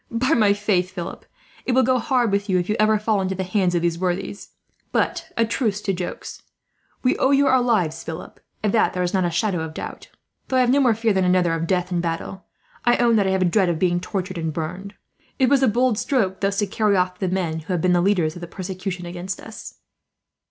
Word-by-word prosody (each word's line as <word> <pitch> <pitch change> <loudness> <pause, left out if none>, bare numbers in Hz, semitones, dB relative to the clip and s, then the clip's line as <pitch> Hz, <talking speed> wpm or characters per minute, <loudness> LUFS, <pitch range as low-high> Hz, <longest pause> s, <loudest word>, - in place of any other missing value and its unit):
By 255 +6 +1
my 210 -6 +4
faith, 200 -3 0
Philip, 180 -1 -7 0.4
it 255 - -1
will 260 +1 +4
go 255 +1 +2
hard 245 -5 +1
with 200 +1 -1
you, 185 - +3
if 175 0 -1
you 210 - +1
ever 215 0 +4
fall 210 -1 0
into 190 0 -2
the 190 - -2
hands 185 -1 0
of 170 - 0
those 170 -1 0
worthies. 185 +2 -3 0.4
"But 335 -2 -1
a 230 - +3
truce 220 -3 -1
to 195 - -1
jokes. 180 -1 -6 0.6
We 255 - +3
owe 265 - +3
you 280 0 +4
our 260 -2 +4
lives, 180 -10 0
Philip; 160 +2 -8 0.2
of 210 - +2
that 225 - +2
there 180 - -1
is 175 - -2
not 190 -2 +2
a - - +1
shadow 175 +1 0
of 160 0 -6
doubt. - - -7 0.4
Though 260 - 0
I - - +5
have 245 -1 +3
no 280 - +4
more 245 -5 +4
fear 225 -1 +1
than 190 -1 +2
another 180 -2 +3
of 165 0 -2
death 180 0 0
in 175 -1 0
battle, 170 +3 -4 0.4
I 240 - +3
own 235 -1 +3
that 200 -2 +2
I - - +2
have 190 0 +1
a - - +2
dread 185 +1 +2
of 170 - 0
being 175 0 +1
tortured 185 -1 -4
and 160 -1 -2
burned. 180 +6 -5 0.4
It 260 -3 +3
was 280 -1 +4
a 265 - +4
bold 240 0 +2
stroke, 205 -10 0
thus 200 0 0
to 205 - +2
carry 205 0 +1
off 180 0 0
the 190 - -1
men 175 -3 -1
who 160 +4 -5
have 175 - 0
been 180 +1 +3
the 175 - +3
leaders 175 -5 +2
of 175 - -10
the 175 - -6
persecution 185 0 -5
against 175 +2 -5
us." 225 - -10
190 Hz, 250 wpm, -22 LUFS, 175-220 Hz, 0.6 s, I